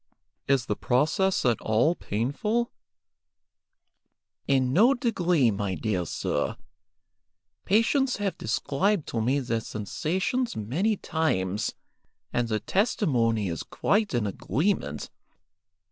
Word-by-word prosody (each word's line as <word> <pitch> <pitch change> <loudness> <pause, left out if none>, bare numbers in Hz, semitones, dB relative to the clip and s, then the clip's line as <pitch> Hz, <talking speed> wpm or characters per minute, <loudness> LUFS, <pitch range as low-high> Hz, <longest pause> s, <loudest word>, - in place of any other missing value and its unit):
"Is 135 -3 +2
the 105 - -1
process 155 - +1
at 120 -2 +2
all 115 +10 +3
painful 175 - -1 0.8
?" - - -52
"In 130 -1 0
no 235 - +5
degree, 180 - +2
my 100 -2 -2
dear 95 -5 -1
sir. - - -2 1.1
Patients 250 +6 +2
have 200 -4 -1
described 150 - 0
to 115 - -1
me 130 +5 +2
their 120 -4 -1
sensations 180 - -2
many 160 - 0
times, 105 - -1 0.6
and 120 -1 +1
their 110 -1 0
testimony 120 - +1
is 85 -2 -3
quite 205 - 0
in 120 -3 +1
agreement. 105 - -1
140 Hz, 110 wpm, -27 LUFS, -, 1.1 s, no